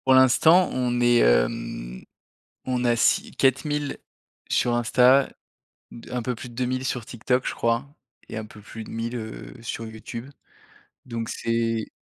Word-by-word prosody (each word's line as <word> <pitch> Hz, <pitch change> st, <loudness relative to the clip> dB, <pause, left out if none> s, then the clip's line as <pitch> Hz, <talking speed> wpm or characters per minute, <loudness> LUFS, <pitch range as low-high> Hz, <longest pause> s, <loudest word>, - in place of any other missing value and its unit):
Pour 130 Hz, -, +6 dB
l'instant, 160 Hz, +8 st, +6 dB
on 125 Hz, -1 st, 0 dB
est, 120 Hz, 0 st, +4 dB
hem, -, -, +1 dB, 0.6 s
on 125 Hz, -1 st, -1 dB
a 120 Hz, -1 st, +4 dB
6 115 Hz, -, +2 dB
4000 145 Hz, +2 st, 0 dB, 0.5 s
sur 120 Hz, -, +2 dB
Insta, 125 Hz, +3 st, +4 dB, 0.6 s
d 115 Hz, -, -12 dB
un 125 Hz, -1 st, -1 dB
peu 125 Hz, +1 st, -2 dB
plus 125 Hz, -, -8 dB
de 120 Hz, -, -13 dB
2000 130 Hz, +1 st, -1 dB
sur 125 Hz, -3 st, -2 dB
TikTok 125 Hz, +3 st, -1 dB
je -, -, -2 dB
crois, 115 Hz, +4 st, -1 dB, 0.4 s
et -, -, -7 dB
un 110 Hz, -, -4 dB
peu 105 Hz, -1 st, -13 dB
plus 110 Hz, +2 st, -9 dB
de -, -, -11 dB
1000, 115 Hz, +2 st, -3 dB
heu, 110 Hz, -2 st, -7 dB
sur 115 Hz, 0 st, -5 dB
YouTube. 115 Hz, +3 st, -8 dB, 0.8 s
Donc 115 Hz, -2 st, -4 dB
c'est 115 Hz, -1 st, -1 dB
120 Hz, 160 wpm, -25 LUFS, 115-130 Hz, 0.8 s, Pour